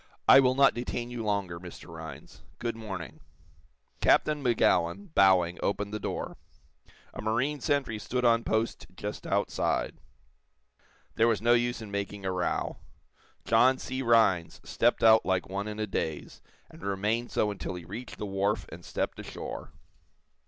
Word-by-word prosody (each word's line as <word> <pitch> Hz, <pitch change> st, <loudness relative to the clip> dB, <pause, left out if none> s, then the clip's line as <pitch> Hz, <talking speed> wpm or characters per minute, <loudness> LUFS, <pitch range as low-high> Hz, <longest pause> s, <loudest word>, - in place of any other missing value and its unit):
"I 135 Hz, -, +10 dB
will 130 Hz, -1 st, +4 dB
not 140 Hz, 0 st, +5 dB
detain 120 Hz, 0 st, -4 dB
you 120 Hz, -2 st, -4 dB
longer, 100 Hz, -5 st, -1 dB
Mr. 90 Hz, -1 st, -11 dB
Rhinds. 80 Hz, -4 st, -10 dB, 0.2 s
Good 120 Hz, -1 st, -3 dB
morning." 95 Hz, -7 st, -7 dB, 0.8 s
Captain 150 Hz, -1 st, +3 dB
Magowan, 125 Hz, -, +1 dB
bowing, 90 Hz, -2 st, +4 dB
opened 100 Hz, +1 st, -1 dB
the 105 Hz, -, -2 dB
door. -, -, -4 dB, 0.8 s
A -, -, -6 dB
marine 125 Hz, +7 st, 0 dB
sentry 135 Hz, -6 st, 0 dB
stood 125 Hz, +3 st, -2 dB
on 115 Hz, -1 st, +4 dB
post 110 Hz, +1 st, -1 dB
just 105 Hz, +2 st, -6 dB
outside. -, -, 0 dB, 1.2 s
There 115 Hz, -, +5 dB
was 115 Hz, -3 st, +2 dB
no 120 Hz, +2 st, +4 dB
use 120 Hz, -1 st, +1 dB
in 105 Hz, -, -9 dB
making 100 Hz, 0 st, -4 dB
a 95 Hz, -, 0 dB
row. 90 Hz, -1 st, -1 dB, 0.7 s
John 125 Hz, +4 st, +5 dB
C. 130 Hz, 0 st, -4 dB
Rhinds 115 Hz, -9 st, +3 dB
stepped -, -, +1 dB
out 110 Hz, 0 st, +7 dB
like 95 Hz, -1 st, 0 dB
one 100 Hz, +2 st, -3 dB
in 105 Hz, 0 st, -5 dB
a 110 Hz, -, 0 dB
daze, 80 Hz, -6 st, -4 dB, 0.3 s
and -, -, -15 dB
remained 105 Hz, +5 st, -1 dB
so 105 Hz, -, +1 dB
until 95 Hz, -2 st, -5 dB
he 90 Hz, -2 st, -8 dB
reached 110 Hz, +8 st, -8 dB
the -, -, -4 dB
wharf 100 Hz, +1 st, 0 dB
and 85 Hz, +1 st, -10 dB
stepped -, -, -3 dB
ashore. -, -, -7 dB
110 Hz, 155 wpm, -29 LUFS, 95-120 Hz, 1.2 s, I